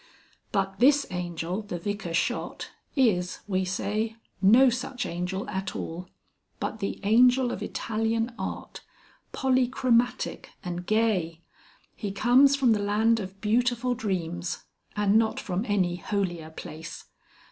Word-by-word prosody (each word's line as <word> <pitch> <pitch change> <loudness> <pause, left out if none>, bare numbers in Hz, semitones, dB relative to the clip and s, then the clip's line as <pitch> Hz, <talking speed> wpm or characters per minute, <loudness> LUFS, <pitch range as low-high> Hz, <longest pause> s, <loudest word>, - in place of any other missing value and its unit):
But 195 -1 -1
this 280 +3 +5
Angel 175 +1 -3
the 200 -4 -5
Vicar 180 -1 -3
shot - - -2 0.2
is, 195 -10 +2
we 190 -2 +1
say, 210 +4 -2 0.3
no 240 +7 +7
such 250 +1 -3
angel 180 +3 -3
at 190 -1 -4
all, 175 +2 -5 0.5
but 220 - -3
the 195 - -3
Angel 245 +4 +5
of - - -5
Italian 225 +2 -1
art, - - -5 0.5
polychromatic 255 -1 +1 0.2
and 175 -1 -5
gay. 195 -7 +1 0.5
He 205 -3 -4
comes 255 +7 +5
from 265 -4 +3
the 215 - +3
land 220 +3 +2
of 195 -1 -7
beautiful 245 +3 +1
dreams 175 -6 -3 0.3
and 210 +1 +4
not 220 -1 0
from 190 +3 -2
any 185 -4 +1
holier 175 -4 -2
place. 160 0 -8
205 Hz, 125 wpm, -27 LUFS, 180-240 Hz, 0.5 s, no